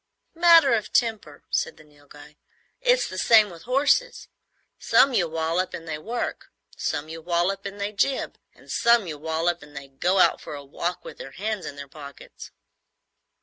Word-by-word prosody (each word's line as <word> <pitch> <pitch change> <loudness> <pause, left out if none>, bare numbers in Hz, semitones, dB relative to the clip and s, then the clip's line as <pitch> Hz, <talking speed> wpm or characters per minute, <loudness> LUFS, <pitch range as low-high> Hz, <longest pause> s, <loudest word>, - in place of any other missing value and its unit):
"Matter 335 -5 +6
of 215 -2 -1
temper," 220 -10 -1
said - - -1
the - - -16
Nilghai. 145 0 -17 0.5
"It's - - +3
the - - -6
same 215 -4 +5
with 170 -1 -13
horses. 290 - +1 0.5
Some 275 - +4
you 180 -7 +2
wallop 165 +3 -1
and 165 - -10
they 155 -1 -4
work, 235 +9 -5 0.2
some 145 0 -3
you 160 +1 -8
wallop 175 +4 -1
and 200 +1 -9
they 200 +1 -2
jib, 260 +6 -1 0.2
and - - -14
some 235 -3 +3
you 155 -4 -6
wallop 160 +2 -1
and 145 0 -13
they 140 -1 -9
go 175 +8 0
out - - +4
for - - -7
a 140 -1 -9
walk 170 +5 -4
with - - -10
their 135 - -9
hands 210 +4 -4
in 145 - -7
their 140 0 -9
pockets." 140 -1 -12
175 Hz, 180 wpm, -24 LUFS, 150-225 Hz, 0.5 s, Matter